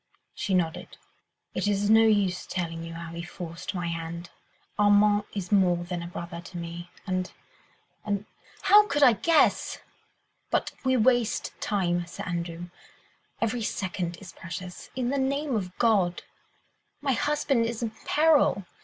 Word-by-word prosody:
She 205 Hz, -5 st, -1 dB
nodded. 170 Hz, -2 st, -2 dB, 0.6 s
"It -, -, -1 dB
is 205 Hz, 0 st, +1 dB
no 220 Hz, 0 st, +8 dB
use 205 Hz, -5 st, +2 dB
telling 165 Hz, -2 st, -3 dB
you 165 Hz, 0 st, -7 dB
how 165 Hz, 0 st, -7 dB
he 170 Hz, -, -5 dB
forced 170 Hz, +1 st, -7 dB
my 175 Hz, -1 st, -2 dB
hand. 170 Hz, +1 st, -5 dB, 0.5 s
Armand 205 Hz, 0 st, +5 dB
is 190 Hz, -2 st, -4 dB
more 180 Hz, -4 st, +3 dB
than 175 Hz, 0 st, -4 dB
a 170 Hz, -, -6 dB
brother 170 Hz, -1 st, -6 dB
to 175 Hz, +1 st, -9 dB
me, 170 Hz, +1 st, -6 dB, 0.2 s
and... 185 Hz, -1 st, -2 dB, 0.7 s
and... 205 Hz, -1 st, -2 dB, 0.4 s
how 420 Hz, +1 st, +7 dB
could 290 Hz, -6 st, +2 dB
I 250 Hz, -4 st, +8 dB
guess?... 305 Hz, -, +3 dB, 0.7 s
But -, -, 0 dB
we 260 Hz, -1 st, +3 dB
waste 245 Hz, -1 st, +2 dB
time, 175 Hz, -4 st, 0 dB
Sir -, -, -7 dB
Andrew... 170 Hz, 0 st, -4 dB, 0.7 s
every 230 Hz, +1 st, 0 dB
second 180 Hz, -4 st, -3 dB
is 185 Hz, -2 st, -11 dB
precious... 180 Hz, +1 st, -8 dB
in 250 Hz, -2 st, -1 dB
the 275 Hz, +1 st, 0 dB
name 275 Hz, 0 st, 0 dB
of 185 Hz, -4 st, -3 dB
God!... 195 Hz, -7 st, +2 dB, 0.8 s
my 280 Hz, -1 st, 0 dB
husband 280 Hz, -3 st, +1 dB
is 235 Hz, 0 st, -4 dB
in 225 Hz, -, -2 dB
peril 300 Hz, -, +3 dB
190 Hz, 150 wpm, -27 LUFS, 175-230 Hz, 0.8 s, no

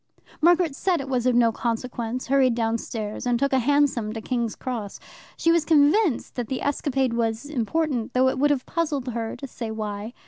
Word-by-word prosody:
Margaret 340 Hz, -2 st, +4 dB
said 370 Hz, +5 st, 0 dB
that -, -, -3 dB
it 270 Hz, -, -7 dB
was 255 Hz, -2 st, 0 dB
of 250 Hz, -, +3 dB
no 235 Hz, -1 st, +4 dB
consequence, 235 Hz, +1 st, -3 dB
hurried 265 Hz, -3 st, +3 dB
downstairs, 225 Hz, -1 st, -3 dB
and 245 Hz, -1 st, +2 dB
took 275 Hz, +2 st, 0 dB
a 265 Hz, -, +4 dB
hansom 260 Hz, -5 st, +1 dB
to 225 Hz, -, -4 dB
King's 235 Hz, -2 st, -2 dB
Cross. 230 Hz, -6 st, -5 dB, 0.4 s
She 330 Hz, -, +3 dB
was 335 Hz, -2 st, +3 dB
convinced 310 Hz, -, +3 dB
that 245 Hz, -2 st, -2 dB
the 260 Hz, -, -3 dB
escapade 270 Hz, -3 st, 0 dB
was 230 Hz, +1 st, -1 dB
important, 275 Hz, -2 st, -1 dB
though 255 Hz, +1 st, +4 dB
it 260 Hz, -, 0 dB
would 290 Hz, +2 st, +3 dB
have 280 Hz, -3 st, 0 dB
puzzled 295 Hz, -6 st, -2 dB
her 230 Hz, -1 st, -3 dB
to 280 Hz, -, -7 dB
say 240 Hz, -3 st, -6 dB
why. 215 Hz, 0 st, -5 dB
255 Hz, 200 wpm, -24 LUFS, 230-285 Hz, 0.4 s, Margaret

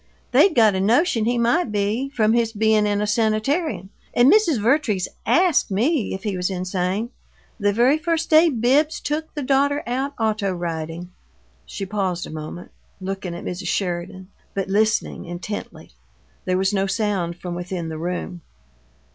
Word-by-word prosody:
They'd 390 Hz, -, +5 dB
got 220 Hz, -4 st, +5 dB
a 190 Hz, -, -1 dB
notion 230 Hz, -, +2 dB
he 240 Hz, +1 st, +1 dB
might 240 Hz, +4 st, +1 dB
be, 210 Hz, +6 st, -1 dB
from 220 Hz, -5 st, +2 dB
his 230 Hz, -1 st, +1 dB
being 215 Hz, 0 st, +3 dB
in 205 Hz, 0 st, 0 dB
a -, -, +1 dB
sanitarium, 220 Hz, -, 0 dB, 0.2 s
and 245 Hz, +6 st, +6 dB
Mrs. 345 Hz, -, +3 dB
Vertrees 220 Hz, -, +1 dB, 0.2 s
ASKED 355 Hz, -3 st, +3 dB
me 230 Hz, -, 0 dB
if 190 Hz, -, -9 dB
he 205 Hz, -3 st, -2 dB
was 180 Hz, +1 st, -1 dB
insane, 185 Hz, +4 st, -2 dB, 0.5 s
the 205 Hz, -1 st, +2 dB
very 245 Hz, +8 st, +3 dB
first 330 Hz, 0 st, -1 dB
day 320 Hz, +2 st, +7 dB
Bibbs 275 Hz, +5 st, +2 dB
took 310 Hz, +2 st, -3 dB
the 295 Hz, -, -3 dB
daughter 280 Hz, +2 st, +2 dB
out 265 Hz, +4 st, -2 dB
auto 215 Hz, -3 st, 0 dB
riding!" 170 Hz, 0 st, -5 dB, 0.6 s
She 195 Hz, -, -5 dB
paused 190 Hz, -3 st, -2 dB
a -, -, -9 dB
moment, 155 Hz, +3 st, -8 dB, 0.3 s
looking 190 Hz, -2 st, -5 dB
at 175 Hz, -, -8 dB
Mrs. 180 Hz, 0 st, -5 dB
Sheridan, 185 Hz, 0 st, -3 dB, 0.3 s
but 195 Hz, -1 st, -2 dB
listening 215 Hz, +2 st, 0 dB
intently. 175 Hz, +4 st, -7 dB, 0.5 s
There 185 Hz, 0 st, +1 dB
was 190 Hz, +2 st, +1 dB
no 195 Hz, -1 st, +1 dB
sound 195 Hz, -4 st, -1 dB
from 175 Hz, 0 st, -6 dB
within 175 Hz, -1 st, -4 dB
the 160 Hz, -1 st, -6 dB
room. 175 Hz, +1 st, -4 dB
210 Hz, 165 wpm, -22 LUFS, 185-255 Hz, 0.6 s, day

